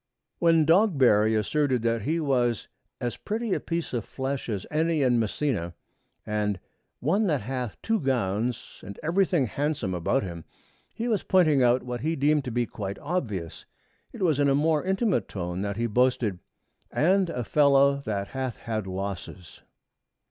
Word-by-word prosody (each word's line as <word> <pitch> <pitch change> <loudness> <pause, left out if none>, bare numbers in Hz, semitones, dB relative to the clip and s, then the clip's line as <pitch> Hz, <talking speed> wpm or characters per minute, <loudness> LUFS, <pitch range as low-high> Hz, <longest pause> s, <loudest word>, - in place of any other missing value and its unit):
When 165 -2 +4
Dogberry 135 - +4
asserted 130 +3 +1
that 115 -1 +1
he 160 +10 0
was 125 -6 0 0.3
'as 120 -1 -3
pretty 220 -1 -2
a - - 0
piece 170 -3 -3
of 120 -3 -1
flesh 135 +1 -4
as 100 -4 -3
any 160 -1 +1
is - - +3
in 120 -1 +3
Messina,' 110 - -1 0.5
and 105 -2 -1 0.4
'one 195 - +2
that 150 -8 +1
hath 125 0 -4
two 225 -1 +1
gowns 120 - -2
and 100 +1 -9
everything 175 -2 +2
handsome 140 -5 -2
about 100 +10 0
him,' 85 -3 -6 0.5
he 230 +1 -3
was 215 -5 +1
pointing 155 -7 +3
out 125 +1 +3
what 125 -1 -5
he 160 +2 0
deemed 145 0 +2
to 125 - -3
be 120 +1 0
quite 100 -3 -6
obvious. 115 - -4 0.4
It 225 - -5
was 155 -5 +2
in 140 -1 +3
a 135 - +3
more 155 +1 +2
intimate 190 - +1
tone 90 -1 -4
that 100 0 -3
he 120 - 0
boasted, 120 -4 +1 0.5
'and 185 +3 +2
a 125 -7 -3
fellow 140 +1 +4
that 105 -7 -3
hath 130 -3 -4
had 110 -3 -4
losses.' 95 -2 -6
130 Hz, 165 wpm, -26 LUFS, 105-155 Hz, 0.5 s, When